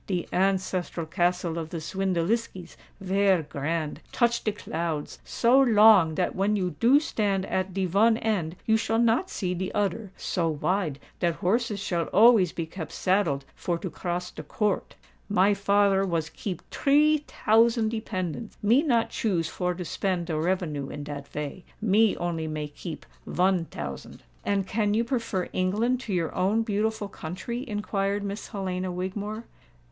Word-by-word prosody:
"De 180 -3 -2
ancestral 185 -2 0
castle 175 +1 0
of 160 -1 -5
the 170 - -5
Swindeliskis 185 +2 -2 0.2
vare 195 -2 +2
grand—touch 165 - -1
de 215 - +1
clouds—so 170 - 0
long 210 -9 +6
dat 180 - 0
when 200 +3 +1
you 185 -3 0
do 255 +5 +6
stand 200 -9 -1
at 185 0 -1
de 190 0 -1
von 215 +6 +4
end 190 -8 -1
you 220 - +4
shall 225 0 0
not 235 +10 +2
see 180 -3 -2
de 185 +1 -3
oder—so 195 -4 -1
wide 160 0 -1 0.2
dat 170 -2 +1
horses 215 +4 0
shall 175 -4 -1
always 215 -4 +5
be 165 - -4
kept 160 0 -7
saddled 170 -8 +1
for 175 -1 -2
to 180 0 -5
cross 180 +2 -3
de - - -8
court. 200 +6 -2 0.3
My 205 0 +4
father 200 -1 +3
was 165 -4 -1
keep 185 -5 -6
tree 300 +2 +3
tousand 225 +1 +3
dependants: 215 -2 -4
me 235 +7 +5
not 240 -7 +1
choose 180 -7 0
for 180 0 -2
to 180 0 -5
spend 180 0 -1
de 165 -2 -3
revenue 155 -4 -1
in 145 - -6
dat 145 -1 -7
vay—me 195 +9 0
only 165 -2 -2
may 155 -1 -4
keep 160 +2 -8 0.2
von 180 -1 +2
tousand." 75 - -8 0.2
"And 200 -1 0
can 205 +1 0
you 230 - +2
prefer 230 -7 -2
England 215 +7 +1
to 245 -5 -6
your 170 -2 -1
own 200 +5 +1
beautiful 215 0 -1
country?" 200 +8 -5
inquired 205 -1 -1
Miss 200 +1 -5
Helena 185 -3 -3
Wigmore. 205 +5 -4
190 Hz, 150 wpm, -27 LUFS, 170-215 Hz, 0.3 s, long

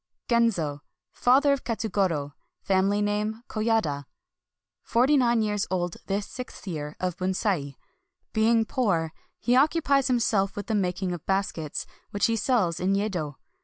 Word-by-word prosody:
Genzo. 195 - +1 0.2
— - - -64
Father 275 +3 +6
of 275 - -3
Katsugoro. 185 -10 -1 0.3
Family 195 +2 +2
name, 210 +2 -1
Koyada. 215 -11 0 0.8
Forty 255 +5 +3
nine 240 -4 +3
years 210 -1 -1
old 175 -2 -1
this 200 +1 -1
sixth 250 -3 -9
year 150 -5 -5
of 180 -1 -2
Bunsei. 185 -6 -1 0.6
Being 225 +1 +3
poor, 175 - 0 0.2
he 245 - +1
occu 300 +5 +4
pies 275 -2 +3
himself 215 -6 +1
with 205 - -4
the 225 - -2
making 185 -2 0
of 175 -3 -5
baskets, 190 -6 -1 0.2
which 205 - +1
he 230 - +2
sells 200 -7 +1
in 190 +2 +1
Yedo. 180 -8 -2
205 Hz, 145 wpm, -26 LUFS, 180-230 Hz, 0.8 s, Father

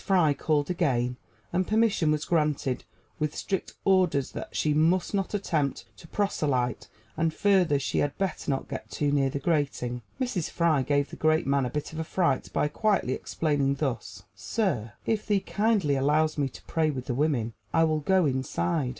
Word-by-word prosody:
Fry 180 -7 +3
called 150 +2 0
again, 125 -8 0 0.4
and 185 +1 +1
permission 215 -7 +2
was 155 0 0
granted, 150 -5 0 0.3
with 155 -1 -1
strict 190 -2 -3
orders 180 -8 +3
that - - -7
she 150 - +1
must 165 +6 +2
not 195 0 -1
attempt 155 -8 -1
to 165 - -14
proselyte, 140 - -1 0.3
and, 165 0 +1
further, 185 -5 +3
she 135 - -1
had 145 -1 -1
better 195 -1 -2
not 135 -1 -1
get - - -6
too 145 -1 0
near 140 -2 +2
the 135 - -3
grating. 140 -5 -1 0.2
Mrs. 245 - -1
Fry 165 -5 +2
gave 145 +1 0
the - - -7
great 155 0 +2
man 140 -2 +2
a - - -4
bit 150 +2 -4
of 160 0 -4
fright 170 -8 0
by - - +1
quietly 195 - +1
explaining 140 -3 0
thus: 135 -3 -3
"Sir, 135 - -2
if 215 -2 -1
thee 205 -2 +3
kindly 205 -8 +1
allows 150 +3 +2
me 140 -2 0
to - - -13
pray 160 -1 0
with 130 -4 -4
the 125 - -2
women, 125 -5 0 0.2
I 165 - +4
will 155 -1 +2
go 185 +3 +3
inside." 130 - 0
155 Hz, 180 wpm, -27 LUFS, 140-180 Hz, 0.4 s, I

